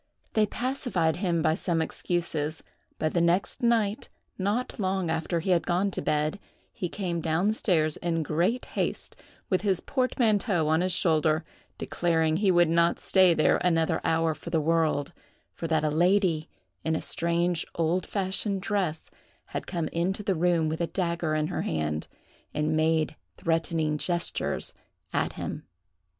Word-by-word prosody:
They 215 Hz, -1 st, +3 dB
pacified 235 Hz, -, -1 dB
him 175 Hz, -4 st, 0 dB
by 155 Hz, -, +3 dB
some 170 Hz, 0 st, 0 dB
excuses; 160 Hz, -2 st, -2 dB, 0.3 s
but 155 Hz, -, -1 dB
the 170 Hz, -, +2 dB
next 175 Hz, +9 st, +1 dB
night, 230 Hz, -1 st, +1 dB, 0.3 s
not 210 Hz, +7 st, -2 dB
long 190 Hz, -3 st, 0 dB
after 165 Hz, +1 st, -1 dB
he 185 Hz, -, -1 dB
had 175 Hz, -2 st, +2 dB
gone 185 Hz, +3 st, +1 dB
to -, -, -3 dB
bed, 155 Hz, +5 st, 0 dB, 0.3 s
he 180 Hz, -, -3 dB
came 175 Hz, -4 st, -3 dB
down 170 Hz, +6 st, +1 dB
stairs 160 Hz, -8 st, +1 dB
in 165 Hz, -2 st, -1 dB
great 175 Hz, +12 st, 0 dB
haste, -, -, -2 dB, 0.4 s
with 185 Hz, -, +2 dB
his 195 Hz, -3 st, +1 dB
portmanteau 220 Hz, -, +1 dB
on 160 Hz, +2 st, +3 dB
his 185 Hz, +1 st, +1 dB
shoulder, 160 Hz, -2 st, +2 dB, 0.3 s
declaring 160 Hz, -2 st, +1 dB
he 200 Hz, +1 st, +2 dB
would 175 Hz, -2 st, +5 dB
not 170 Hz, +1 st, +3 dB
stay 185 Hz, -3 st, +4 dB
there 155 Hz, -, +4 dB
another 165 Hz, -2 st, +1 dB
hour 165 Hz, 0 st, +2 dB
for 155 Hz, +3 st, -9 dB
the 165 Hz, -1 st, +2 dB
world; 160 Hz, -1 st, +1 dB, 0.4 s
for 165 Hz, -, -4 dB
that 160 Hz, -1 st, +1 dB
a 155 Hz, -, +1 dB
lady, 175 Hz, -1 st, +2 dB, 0.3 s
in 160 Hz, 0 st, 0 dB
a -, -, -2 dB
strange 170 Hz, 0 st, 0 dB
old 170 Hz, +2 st, 0 dB
fashioned 195 Hz, 0 st, -1 dB
dress, 185 Hz, -7 st, -2 dB, 0.4 s
had -, -, -4 dB
come 170 Hz, -3 st, -2 dB
into 185 Hz, +5 st, -1 dB
the 195 Hz, -, +1 dB
room 170 Hz, -1 st, +2 dB
with 160 Hz, +2 st, -2 dB
a 170 Hz, -, +1 dB
dagger 170 Hz, -4 st, -1 dB
in 155 Hz, 0 st, +1 dB
her 175 Hz, -, -2 dB
hand, 75 Hz, -1 st, -2 dB, 0.5 s
and 155 Hz, +1 st, +1 dB
made 160 Hz, 0 st, +1 dB, 0.2 s
threatening 165 Hz, -2 st, 0 dB
gestures 175 Hz, +1 st, -1 dB, 0.4 s
at -, -, 0 dB
him. -, -, -6 dB
170 Hz, 160 wpm, -27 LUFS, 160-190 Hz, 0.5 s, would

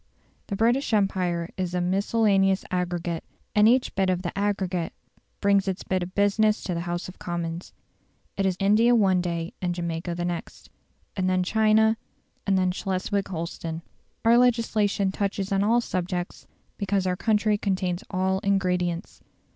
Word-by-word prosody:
The 200 Hz, -, -3 dB
British 235 Hz, +4 st, +1 dB
Empire 180 Hz, -4 st, 0 dB
is 180 Hz, -1 st, -2 dB
a -, -, +1 dB
miscellaneous 195 Hz, +1 st, +2 dB
aggregate, 175 Hz, -2 st, -2 dB, 0.3 s
and 210 Hz, 0 st, +5 dB
each 250 Hz, +1 st, +2 dB
bit 195 Hz, -1 st, +1 dB
of 180 Hz, 0 st, 0 dB
the 175 Hz, -, -4 dB
aggregate 195 Hz, -4 st, -1 dB, 0.5 s
brings 200 Hz, -1 st, +3 dB
its 190 Hz, -1 st, -2 dB
bit 185 Hz, -1 st, -1 dB
of 175 Hz, +1 st, -6 dB
business 210 Hz, +1 st, +2 dB
to 180 Hz, -, -2 dB
the 170 Hz, -, -2 dB
House 175 Hz, +1 st, -3 dB
of 185 Hz, -, -11 dB
Commons. 170 Hz, 0 st, -4 dB, 0.6 s
It 195 Hz, -1 st, +1 dB
is 185 Hz, -1 st, -1 dB
India 215 Hz, +5 st, +4 dB
one 190 Hz, -5 st, +3 dB
day 170 Hz, -1 st, -3 dB
and 175 Hz, -1 st, -1 dB
Jamaica 170 Hz, 0 st, -3 dB
the 175 Hz, 0 st, -2 dB
next; 175 Hz, -1 st, -6 dB, 0.4 s
then 185 Hz, -2 st, -1 dB
again 185 Hz, 0 st, +2 dB
China, 220 Hz, +2 st, +3 dB, 0.5 s
and 195 Hz, -1 st, +3 dB
then 185 Hz, -1 st, +2 dB
Schleswig 195 Hz, +1 st, -2 dB
Holstein. 165 Hz, -2 st, -5 dB, 0.4 s
Our 235 Hz, +1 st, +6 dB
legislation 220 Hz, -5 st, +2 dB
touches 200 Hz, 0 st, -2 dB
on 195 Hz, 0 st, +2 dB
all 230 Hz, +3 st, +3 dB
subjects, 180 Hz, -3 st, -4 dB, 0.3 s
because 200 Hz, -1 st, 0 dB
our 180 Hz, -1 st, +1 dB
country 210 Hz, +1 st, +1 dB
contains 185 Hz, -3 st, -1 dB
all 190 Hz, 0 st, 0 dB
ingredients. 180 Hz, -2 st, -1 dB
190 Hz, 155 wpm, -25 LUFS, 180-205 Hz, 0.6 s, Our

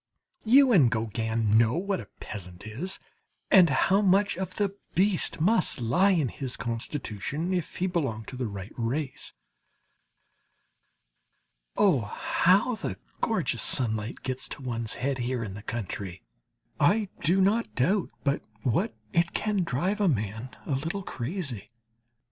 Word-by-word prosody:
You 260 Hz, +3 st, +6 dB
and 155 Hz, -, +6 dB
Gauguin 110 Hz, -1 st, +1 dB
know 115 Hz, 0 st, +3 dB
what 195 Hz, +2 st, -1 dB
a 105 Hz, -, -8 dB
peasant 90 Hz, -2 st, -8 dB
is, 145 Hz, -, -3 dB, 0.5 s
and 185 Hz, -4 st, +8 dB
how 190 Hz, +9 st, +3 dB
much 200 Hz, +1 st, +3 dB
of 185 Hz, 0 st, -5 dB
the 200 Hz, -2 st, 0 dB, 0.2 s
beast 190 Hz, -2 st, +2 dB
must 185 Hz, -, +3 dB
lie 170 Hz, -, +3 dB
in 160 Hz, -9 st, +2 dB
his 130 Hz, 0 st, -5 dB
constitution 125 Hz, -, -3 dB
if 175 Hz, -4 st, -2 dB
he 180 Hz, -, 0 dB
belong 140 Hz, -12 st, -1 dB
to -, -, -8 dB
the 125 Hz, -2 st, -2 dB
right 100 Hz, -1 st, -7 dB
race. 130 Hz, +5 st, -2 dB, 2.4 s
Oh, 185 Hz, -10 st, +5 dB
how 185 Hz, -, +2 dB
the 100 Hz, -, -4 dB, 0.2 s
gorgeous -, -, 0 dB
sunlight 110 Hz, -2 st, 0 dB
gets 130 Hz, 0 st, -3 dB
to 140 Hz, -, -7 dB
one's 115 Hz, -3 st, -3 dB
head 135 Hz, 0 st, -1 dB
here 120 Hz, -1 st, -1 dB
in 100 Hz, -4 st, -5 dB
the 105 Hz, -, -8 dB
country! 100 Hz, -, -5 dB, 0.6 s
I 205 Hz, +7 st, +3 dB
do 180 Hz, +5 st, +2 dB
not 210 Hz, +5 st, +2 dB
doubt 180 Hz, +10 st, +2 dB
but 140 Hz, 0 st, +1 dB, 0.2 s
what 115 Hz, -2 st, +1 dB, 0.2 s
it 170 Hz, 0 st, +2 dB
can 210 Hz, -1 st, 0 dB
drive 180 Hz, +8 st, -1 dB
a 200 Hz, -, +4 dB
man 110 Hz, -, -1 dB, 0.2 s
a -, -, -4 dB
little 165 Hz, +9 st, -2 dB
crazy. 130 Hz, -, -4 dB
140 Hz, 145 wpm, -28 LUFS, 115-190 Hz, 2.4 s, and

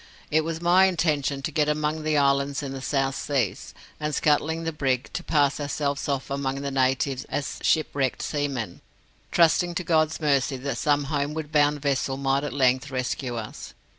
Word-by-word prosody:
It 155 Hz, +1 st, +3 dB
was 165 Hz, +1 st, -4 dB
my 180 Hz, +2 st, +6 dB
intention 150 Hz, -6 st, 0 dB
to 160 Hz, -, -2 dB
get 150 Hz, 0 st, +1 dB
among 150 Hz, +1 st, -1 dB
the 155 Hz, -1 st, +1 dB
islands 140 Hz, 0 st, +2 dB
in 135 Hz, -, -4 dB
the 135 Hz, -1 st, -6 dB
South 135 Hz, 0 st, 0 dB
Seas, 125 Hz, -10 st, -2 dB, 0.3 s
and 150 Hz, 0 st, -2 dB
scuttling 160 Hz, +2 st, +1 dB
the 165 Hz, -, -1 dB
brig, 135 Hz, -4 st, -1 dB
to -, -, -4 dB
pass 145 Hz, -3 st, +2 dB
ourselves 145 Hz, 0 st, -2 dB
off 135 Hz, -1 st, -2 dB
among 135 Hz, 0 st, -2 dB
the 140 Hz, 0 st, -3 dB
natives 130 Hz, 0 st, +1 dB
as 140 Hz, -, -4 dB
shipwrecked 140 Hz, -5 st, +1 dB
seamen, 135 Hz, -, -3 dB, 0.5 s
trusting 170 Hz, +1 st, +3 dB
to 180 Hz, -, -1 dB
God's 160 Hz, -2 st, +2 dB
mercy 140 Hz, -3 st, +1 dB
that 140 Hz, +2 st, -3 dB
some 145 Hz, -1 st, +2 dB
homeward 145 Hz, +2 st, -3 dB
bound 145 Hz, -1 st, +2 dB
vessel 135 Hz, -1 st, 0 dB
might 135 Hz, 0 st, +1 dB
at 145 Hz, -, -3 dB
length 130 Hz, 0 st, +2 dB
rescue 130 Hz, -1 st, -3 dB
us. 115 Hz, -2 st, -7 dB
145 Hz, 175 wpm, -25 LUFS, 135-155 Hz, 0.5 s, my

